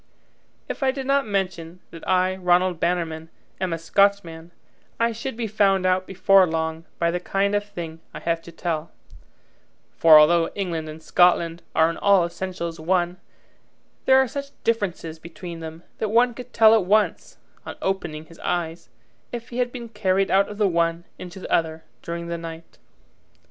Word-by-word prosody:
If - - -6
I 270 - +3
did 265 0 -3
not 275 -2 +2
mention 185 -4 -3
that 165 - -11
I, 185 0 +2
Ranald 180 -1 +2
Bannerman, 165 -2 -2 0.3
am 185 -2 -1
a 165 - -1
Scotchman, 170 -1 +1 0.5
I 230 0 +2
should 230 +2 -6
be 235 - -2
found 195 -3 +2
out 185 0 +1
before 195 0 +4
long 160 0 -3
by 170 0 +1
the 180 - -2
kind 200 +2 0
of 205 0 +1
thing 170 -5 -8
I - - -8
have 165 -1 -1
to 170 - -12
tell; 165 -1 -3 1.1
for 160 -2 +8
although 165 +2 +5
England 170 -5 -3
and 155 +1 -10
Scotland 170 -1 +3
are 160 - +5
in 165 - -3
all 200 -4 +4
essentials 170 -1 -5
one, 175 +2 0 0.9
there 265 0 +6
are 265 0 +4
such 280 +3 -6
differences 180 -8 -2
between 170 +1 -9
them 160 +1 -8 0.2
that 215 - -1
one 240 +3 +3
could 250 +1 -10
tell 220 -1 +6
at 220 -5 +3
once, 210 +2 +1 0.3
on - - -7
opening 165 -5 -3
his 165 +1 -17
eyes, 165 -1 -3 0.4
if 235 0 -6
he 240 - -5
had 245 -1 0
been 240 -2 -7
carried 195 -3 0
out 195 +1 +3
of 205 - -8
the 210 -1 +3
one 170 -1 0 0.2
into 180 +1 -9
the - - -5
other 160 -1 0 0.2
during 170 0 -5
the 170 0 -4
night. 165 0 -10
180 Hz, 175 wpm, -23 LUFS, 165-205 Hz, 1.1 s, for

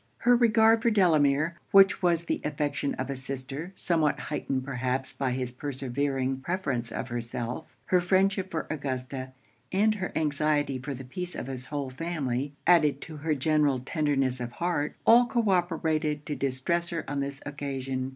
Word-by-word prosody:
Her 245 +1 +4
regard 225 -1 +5
for 235 - +3
Delamere, 165 -5 +3
which 195 -1 +6
was 170 -2 +2
the - - -2
affection 145 -1 -1
of 130 +1 -3
a - - -3
sister 135 +5 -5
somewhat 160 -5 +1
heightened 135 -3 -2
perhaps 130 0 -2
by 135 0 -1
his 125 0 -2
persevering 135 0 -2
preference 130 -7 -2
of - - -4
herself, 120 +3 -5
her 180 -1 +3
friendship 190 +1 +2
for 160 -3 -3
Augusta, 130 -2 -4 0.4
and 210 +3 +3
her 190 -3 -4
anxiety 150 -2 +1
for 135 +2 -5
the 130 +1 -8
peace 180 +8 -5
of - - -4
his 130 -1 -5
whole 140 -3 -3
family, 140 -3 -2
added 155 -5 +4
to 155 -2 -8
her 155 +1 0
general 145 -1 +2
tenderness 135 -2 0
of 120 -1 -5
heart, 170 -2 -1
all 240 +1 +7
co 235 -3 0
operated 160 -4 0
to 150 - -3
distress 140 +7 0
her 170 -1 -4
on 145 0 -2
this 140 0 -3
occasion. 135 -2 -3
145 Hz, 165 wpm, -28 LUFS, 130-170 Hz, 0.4 s, all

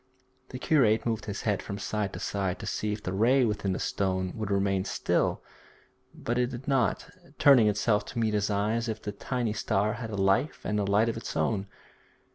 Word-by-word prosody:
The 125 - -6
curate 120 -7 +3
moved 115 -2 -1
his 105 -1 -5
head 105 -3 0
from 100 - -6
side 105 -1 -2
to - - -6
side 95 -2 -2
to - - -8
see 105 - -2
if 105 0 -5
the 90 - -3
ray 125 +6 +4
within 105 -3 -1
the - - -2
stone 95 -1 -1
would 110 -2 -4
remain 100 -1 +1
still, 100 - 0 0.7
but 120 +1 -3
it 125 - +2
did 125 +1 -8
not, 135 -5 +1 0.3
turning 130 -6 +6
itself 105 0 +1
to - - -9
meet 110 -2 +1
his 105 0 +1
eye 105 +1 +1
as 115 0 -1
if 110 -1 -3
the 105 - -5
tiny 115 +2 -2
star 105 0 0
had 115 0 -6
a 105 - -4
life 100 +9 +1
and 105 +1 0
a 100 - 0
light 100 +3 +3
of 115 - -2
its 115 - -5
own. 100 -2 0
105 Hz, 215 wpm, -28 LUFS, 100-115 Hz, 0.7 s, turning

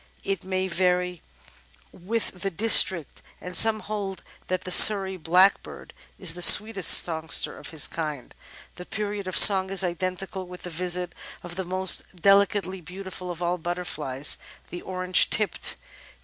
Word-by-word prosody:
It 195 -3 -5
may 185 0 -4
vary 180 -1 -2 0.7
with 190 0 -5
the 195 - -3
district, 190 -4 +2 0.2
and 180 0 -10
some 220 +2 +3
hold 200 -3 -7 0.2
that 185 0 -4
the 185 - -8
Surrey 195 -1 +6
Blackbird 180 +3 -1 0.2
is 175 -4 -2
the 180 - -8
sweetest 200 +1 +4
songster 160 -1 -1
of - - -12
his 160 -3 0
kind. 150 -5 -8 0.4
The 180 - -11
period 205 -2 -6
of 185 - +1
song 190 -2 +7
is 195 -1 -1
identical 185 +1 -6
with 180 0 -13
the 180 - -9
visit 180 +1 -4 0.3
of 175 -1 -10
the 190 - -5
most 185 +1 -1
delicately 195 0 0
beautiful 185 +1 -10
of 175 0 -8
all 175 +1 -3
butterflies 155 -5 -3
— - - -27
the 175 - -8
Orange 185 -1 +2
Tipped. 215 -3 -2
185 Hz, 150 wpm, -23 LUFS, 175-195 Hz, 0.7 s, song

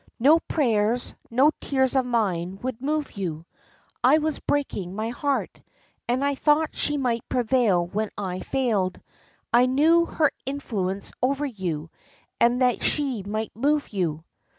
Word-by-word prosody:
No 290 +7 +5
prayers, 235 -7 0 0.2
no 265 +6 +4
tears 265 -1 +1
of 260 -2 +2
mine 190 -6 -1
would 250 -2 -4
move 300 +1 -1
you. 165 -5 -5 0.6
I 265 +5 +6
was 310 0 -1
breaking 200 -10 -2
my 220 +2 -2
heart, 275 +3 -2 0.5
and 255 +3 +1
I 285 - +2
thought 300 +3 +2
she 295 - +1
might 240 -4 -1
prevail 235 -7 +2
when 210 +4 -2
I 185 -3 -3
failed; 210 -9 -1 0.5
I 245 +2 +6
knew 320 +6 +4
her 305 -3 +2
influence 205 -9 -3
over 275 +3 +1
you, 175 - -4 0.5
and 245 +2 +3
that 250 -1 +2
she 275 -7 +1
might 215 +3 -4
move 290 +5 +1
you." 165 -6 -2
245 Hz, 145 wpm, -25 LUFS, 200-280 Hz, 0.6 s, I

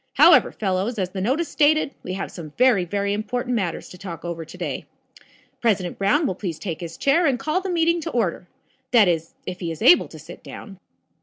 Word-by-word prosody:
However, - - +6
fellows, 195 +3 -2
as 185 -2 -2
the 190 - -4
notice 275 - 0
stated, 300 0 +2
we 185 - -5
have 190 - -4
some 155 -4 -9
very, 240 -8 +4
very 200 +2 -1
important 245 +4 -2
matters 185 -7 -2
to 180 - -12
talk 175 -4 -8
over 170 -1 -4
to 160 - -12
day. - - -4 0.7
President 205 -6 0
Brown 205 +11 +2
will 190 - 0
please 180 -4 -5
take 175 -5 -5
his 165 -1 -7
chair 315 +5 +3
and 265 -3 +2
call 310 +9 -1
the 380 - -4
meeting 335 -1 +2
to 330 - -4
order. 195 - -1 0.4
That 230 -6 +5
is, 165 -2 -1
if 180 0 -6
he 170 - -3
is 160 -1 -6
able 175 - +6
to 160 - -12
sit 160 +3 -12
down. 195 -3 -10
200 Hz, 215 wpm, -23 LUFS, 175-255 Hz, 0.7 s, However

